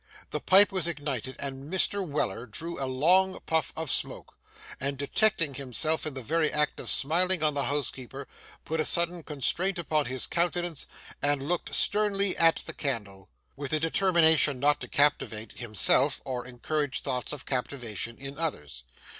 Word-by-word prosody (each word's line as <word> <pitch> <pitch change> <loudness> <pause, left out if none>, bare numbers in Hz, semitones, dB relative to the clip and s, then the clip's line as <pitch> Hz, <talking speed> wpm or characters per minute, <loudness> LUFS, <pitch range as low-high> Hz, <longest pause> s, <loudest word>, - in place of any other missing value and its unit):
The - - -2
pipe 200 +2 +5
was 185 -4 0
ignited, 140 -6 -4
Mr. 145 +9 -1
Weller 140 - -3
drew 165 +8 -6
a - - -1
long 180 +9 +2
puff 160 -3 0
of 160 -3 -3
smoke, - - -1 0.5
and 140 +1 -2
detecting 160 +2 +1
himself 140 +4 -1
in 150 - -6
the 130 - -5
very 160 +4 +1
act 150 -1 0
of - - -4
smiling 175 +4 +3
on 150 -1 +2
the 140 -1 0
housekeeper, 135 -1 -3 0.4
put 160 +1 -3
a - - +2
sudden 170 +2 +3
constraint 165 +6 0
upon 155 -4 -1
his 130 0 0
countenance 175 -2 -1 0.3
and 145 -1 0
looked 175 +1 -2
sternly 200 -2 +3
at 165 -1 +4
the - - -5
candle, 105 -8 -4 0.3
with 140 0 -5
a 155 - +2
determination 160 -4 +3
not 145 +2 +2
to - - -4
captivate, 120 -7 0
himself, 125 +4 +2
or 125 -2 -5
encourage 140 +3 -3
thoughts 125 -1 -2
of 150 -3 -7
captivation 120 -3 -4
in 140 +1 -8
others. 75 - -4
145 Hz, 160 wpm, -27 LUFS, 130-165 Hz, 0.5 s, pipe